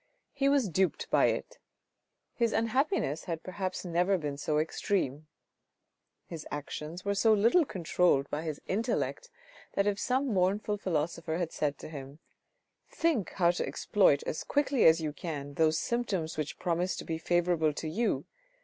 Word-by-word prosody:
He 275 0 +2
was 280 -5 +3
duped 185 +1 0
by - - +5
it. - - -3 0.7
His 235 -2 +1
unhappiness 230 - 0
had 165 -2 -4
perhaps 185 0 -4
never 180 +3 +2
been 145 -4 -3
so 150 +1 -1
extreme. 155 -2 -1 1.0
His 165 -3 -8
actions 150 +4 -6
were 200 - +1
so 220 +2 +4
little 230 - +4
controlled 175 - +1
by 150 - -2
his 155 -3 -4
intellect 230 - -1 0.4
that 200 - +1
if 205 -1 0
some 260 +1 0
mournful 200 +3 +1
philosopher 165 -2 -1
had 175 -2 -2
said 145 -2 -1
to - - -9
him, 140 -2 -8 0.4
" - - -46
Think 315 - +1
how 175 -2 +3
to 175 - -3
exploit 185 -9 +3
as - - -3
quickly 285 -3 +2
as 160 0 +6
you 155 -2 -2
can 145 -4 -5
those 160 +1 +3
symptoms 200 -10 -1
which 155 -1 -4
promise 180 +1 0
to - - -7
be 160 -1 -3
favourable 175 -2 +2
to 160 - -5
you. 220 +9 0
175 Hz, 160 wpm, -30 LUFS, 155-210 Hz, 1.0 s, as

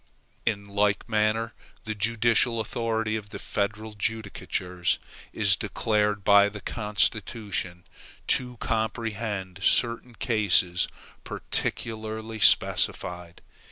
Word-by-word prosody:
In 100 -2 0
like 100 +1 +1
manner 110 0 +1 0.3
the 110 - -3
judicial 115 +2 +2
authority 110 0 -1
of 105 -2 -5
the - - -7
federal 110 +2 -3
judicatures 100 -4 -2 0.3
is 100 -3 +4
declared 105 0 0
by 100 0 +6
the 105 0 -8
Constitution 105 -3 -1 0.4
to 125 -1 +1
comprehend 110 -4 -3
certain 120 +3 +2
cases 100 -7 +2 0.4
particularly 110 0 -3
specified. 90 -3 +2
110 Hz, 90 wpm, -26 LUFS, 100-115 Hz, 0.4 s, by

